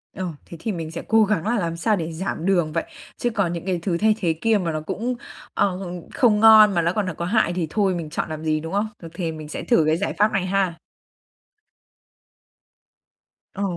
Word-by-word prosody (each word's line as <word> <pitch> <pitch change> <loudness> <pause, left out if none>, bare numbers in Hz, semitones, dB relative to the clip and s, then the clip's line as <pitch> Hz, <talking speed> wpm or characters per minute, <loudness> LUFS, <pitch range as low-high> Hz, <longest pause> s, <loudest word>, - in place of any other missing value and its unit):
Ờ, 185 - -3 0.2
thế 170 - -10
thì 220 - -2
mình 165 -4 -5
sẽ 165 - -5
cố 220 0 +5
gắng 205 -3 0
là 235 0 +1
làm 170 -2 -2
sao 215 +5 +2
để 165 -3 -4
giảm 165 0 -4
đường 175 -5 +2
vậy. 165 - 0 0.3
Chứ 240 - 0
còn 200 -7 0
những 170 0 -5
cái 185 -2 -1
thứ 170 -1 -1
thay 215 +3 +3
thế 170 -6 +1
kia 225 -1 +3
mà 175 -4 -1
nó 155 0 -3
cũng, 235 +10 -3 0.4
à, - - +3 0.5
không 220 -5 +3
ngon 215 -1 +8
mà 170 - +2
nó 170 +1 +1
còn 210 -1 0
là 185 - -2
có 170 - -4
hại 190 -2 +2
thì 175 -2 -2
thôi 195 0 +1
mình 165 -3 -5
chọn 155 - -3
làm 155 0 -6
gì, 155 -1 +1
đúng 165 +3 -7
không? 205 +2 +1
Được 165 - -8
thì 170 -1 -3
mình 155 -1 -8
sẽ - - -5
thử 235 -10 +3
cái 155 - +3
giải 200 - -2
pháp 210 +1 +3
này 195 -2 0
ha. 190 -2 +1 2.8
Ờ. 200 - -3
180 Hz, 230 wpm, -23 LUFS, 165-210 Hz, 2.8 s, ngon